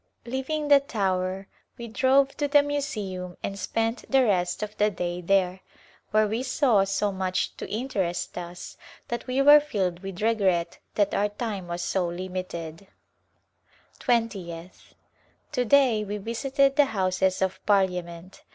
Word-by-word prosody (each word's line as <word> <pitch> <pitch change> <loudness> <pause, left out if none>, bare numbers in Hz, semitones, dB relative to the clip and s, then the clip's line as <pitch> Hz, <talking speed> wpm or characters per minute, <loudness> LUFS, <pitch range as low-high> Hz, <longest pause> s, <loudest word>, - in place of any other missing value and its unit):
Leaving 265 +5 -2
the 285 -1 +7
Tower 190 -6 -2 0.3
we 235 -1 -7
drove 270 +4 +3
to 290 - -1
the 290 0 +5
Museum 205 -11 -4
and 200 0 -4
spent 225 +3 -1
the 270 -1 +4
rest 180 -3 0
of 210 0 -6
the 210 0 +3
day 175 -2 -4
there, 185 0 +1 0.5
where 215 0 +3
we 220 +3 -2
saw 255 -5 +3
so 195 +1 0
much 185 -1 -2
to - - -7
interest 195 -7 -2
us 175 0 -8 0.3
that 240 +2 -4
we 260 +2 +1
were 295 +1 +9
filled 195 -12 -2
with 195 -2 -7
regret 195 -7 +1 0.2
that 205 -2 +2
our 205 +1 +1
time 205 -4 -5
was 175 0 -4
so 185 -2 0
limited. 180 -1 -6 1.1
Twentieth, 190 -8 -3 0.6
To 250 -5 0
day 245 -4 +4
we 210 0 -4
visited 270 +6 0
the 290 - +6
Houses 190 -4 0
of 190 -1 -2
Parliament. 180 -3 0
200 Hz, 145 wpm, -26 LUFS, 185-250 Hz, 1.1 s, were